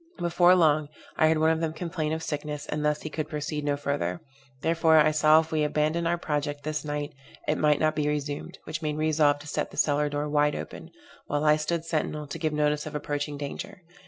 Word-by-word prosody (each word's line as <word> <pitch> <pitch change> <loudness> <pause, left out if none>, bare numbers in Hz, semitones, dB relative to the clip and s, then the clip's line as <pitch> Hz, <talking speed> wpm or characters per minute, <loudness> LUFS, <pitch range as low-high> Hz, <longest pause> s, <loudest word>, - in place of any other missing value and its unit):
Before 175 +1 +4
long, 155 -4 +3 0.3
I 155 - +4
heard 160 0 +3
one 160 +1 +3
of 160 - 0
them 160 -1 -1
complain 165 -2 -3
of 160 0 -3
sickness, 150 -1 -4
and 150 0 -3
thus 150 0 0
he 155 - -4
could 155 0 -3
proceed 150 -1 -3
no 145 -1 0
further; 145 +3 -2 0.4
therefore, 165 0 +4
I 155 0 +5
saw 155 +1 +5
if 160 - -10
we 155 -1 +1
abandoned 155 +3 0
our 175 +1 +1
project 145 -2 -3
this 155 0 -3
night, 145 0 -4 0.3
it - - +1
might 150 -1 +3
not 155 0 +2
be 150 -1 0
resumed, 145 -1 -3
which 155 +1 -5
made 155 -1 -1
me 155 - 0
resolve 150 -2 +3
to 145 +1 -12
set - - -2
the - - -13
cellar 150 0 +2
door 145 +1 -2
wide 150 0 +2
open, - - -7 0.4
while 145 +1 -1
I 150 0 +6
stood 160 +2 -2
sentinel 155 -2 -2
to 145 +3 -7
give 155 -1 0
notice 150 0 0
of - - -7
approaching 145 0 -3
danger. 145 +5 -7
150 Hz, 225 wpm, -27 LUFS, 150-160 Hz, 0.4 s, I